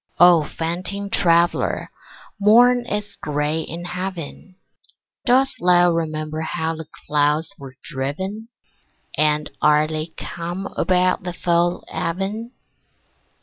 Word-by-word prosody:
O 175 -2 +7
fainting 185 +5 -4
traveller, 170 -1 +2 0.5
morn 240 +4 +5
is 210 -2 -3
gray 150 +2 -1
in 170 +3 -7
heaven. 180 0 -6 0.7
Dost 260 +2 +3
thou 175 0 +5
remember 155 -1 -2
how 160 0 -2
the 160 0 -8 0.2
clouds 150 +4 +1
were 135 -1 -10
driven? 190 +10 -4 0.7
And 150 0 +1
are 150 0 +4
they 155 0 -3
calm 175 +3 -6
about 185 0 +2
the 180 -1 -5
fall 175 0 +1
of 170 -1 -2
even? 210 +5 -4
170 Hz, 110 wpm, -21 LUFS, 155-190 Hz, 0.7 s, O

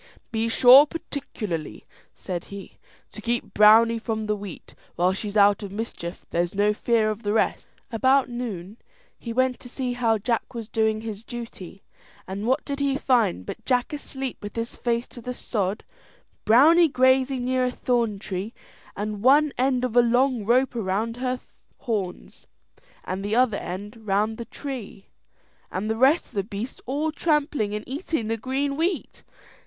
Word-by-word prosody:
"Be 225 0 0
sure, 255 +5 +8
particularly," 215 - -5 0.3
said 175 -2 -5
he, 200 -1 -10 0.3
"to - - -10
keep 235 0 -2
Browney 225 +2 +6
from 220 -2 -2
the 210 0 0
wheat; 200 -3 -9 0.2
while 180 +2 +2
she's 205 +2 -3
out 205 +1 +5
of 200 -2 -6
mischief 200 -5 -6
there's 175 +2 -1
no 205 +1 +3
fear 220 0 +1
of 215 +1 -6
the 205 -1 -1
rest." 220 - 0 0.2
About 260 +4 +3
noon, 220 -5 -6 0.4
he 235 - -6
went 255 +1 +1
to 245 - -11
see 255 -1 -3
how 230 -2 +2
Jack 230 +3 -2
was 230 -2 -5
doing 220 -1 0
his 220 -1 -6
duty, 230 -6 -9 0.4
and 200 +4 -4
what 260 - +1
did 280 -1 -4
he 280 -1 +1
find 235 - +1
but - - -7
Jack 250 +2 0
asleep 270 -3 -5
with 205 0 -7
his 230 0 -4
face 235 0 -1
to 240 - -11
the 250 +2 -5
sod, 205 -4 -2 0.6
Browney 310 +8 +6
grazing 260 0 +3
near 255 0 +1
a 250 - 0
thorn 235 -4 0
tree, 195 +2 -5 0.4
one 255 +9 +3
end 255 -1 +1
of 245 -2 -4
a 245 - +8
long 245 0 +2
rope 250 +5 +2
round 225 +1 -2
her 255 0 -2 0.4
horns, 205 -7 -4 0.6
and 190 +1 -4
the 205 +2 -1
other 245 -4 +3
end 200 +5 -6
round 210 +3 +1
the 235 - -5
tree, 250 -9 -8 0.6
and 195 +3 -3
the 220 - 0
rest 270 +8 +4
of - - -25
the 200 -3 -1
beasts 210 +5 -6
all 295 +4 -1
trampling 295 -10 0
and 210 - -6
eating 275 - -3
the 225 - +1
green 270 +5 -2
wheat. 340 +5 -2
230 Hz, 170 wpm, -25 LUFS, 205-255 Hz, 0.6 s, sure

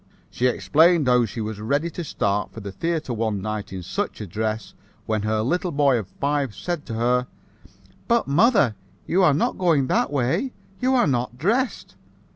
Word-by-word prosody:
"She 125 - +1
explained 160 +4 +3
how 125 -1 +4
she 110 +2 -6
was 110 -1 -4
ready 145 +9 0
to 175 - -5
start 100 -8 -1
for - - -9
the 100 -2 -7
theater 160 - -2
one 110 -3 -1
night 105 0 -4
in 95 -2 -6
such 200 - -3
a 105 - -5
dress, 110 +3 -3 0.3
when 110 -1 -1
her 110 +1 0
little 175 +7 0
boy 140 -4 +3
of 105 - -6
five 140 -5 0
said 170 - -4
to 115 - -4
her, 125 +2 +1 0.8
'But, 235 0 +2
mother, 170 - +4 0.3
you 185 +3 +2
are 155 -6 +5
not 155 - 0
going 165 -7 +3
that - - +1
way? 140 - 0 0.3
You 260 +1 +2
are 250 - +4
not 125 -3 -1
dressed.' 230 - -1
130 Hz, 185 wpm, -23 LUFS, 110-170 Hz, 0.8 s, are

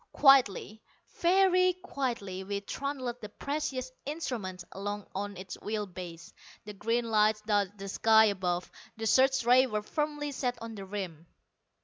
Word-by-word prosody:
Quietly, 220 -6 +4 0.4
very 365 0 +4
quietly, 240 - -4
we 200 +1 -3
trundled 255 +1 -4
the 210 - -7
precious 265 0 -3
instrument 240 - -4
along 205 +1 -4
on 200 +1 -4
its 185 0 -8
wheel 210 0 -2
base. 175 -3 -9 0.3
The 210 - -7
green 230 +4 0
lights 215 0 +3
dotted 205 -2 0
the 195 0 -7
sky 220 +2 +5
above: 185 -3 -1 0.3
the 225 - -4
search 265 +3 +4
rays 255 +2 +6
were 210 -1 -2
firmly 295 +3 -2
set 250 -2 -2
on 230 0 -7
the 200 -2 -7
rim. 185 -5 -6
220 Hz, 145 wpm, -30 LUFS, 195-265 Hz, 0.4 s, rays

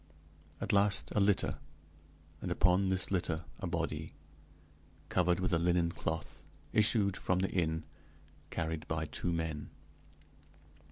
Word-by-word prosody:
At - - -1
last 100 0 +3
a - - +2
litter, 100 -1 +2 0.8
and - - -3
upon 90 +2 +3
this 95 0 0
litter 85 -4 -1
a 95 - -3
body, 80 -3 -3 0.9
covered 90 -1 +2
with 90 0 0
a 85 - +4
linen 85 0 +2
cloth, 80 -3 -4 0.3
issued 105 -3 +4
from 90 - 0
the 95 +1 0
inn, 80 -3 0 0.7
carried 80 -1 -3
by 80 0 -1
two 85 +3 -3
men. 80 -3 -2
85 Hz, 125 wpm, -33 LUFS, 80-95 Hz, 0.9 s, a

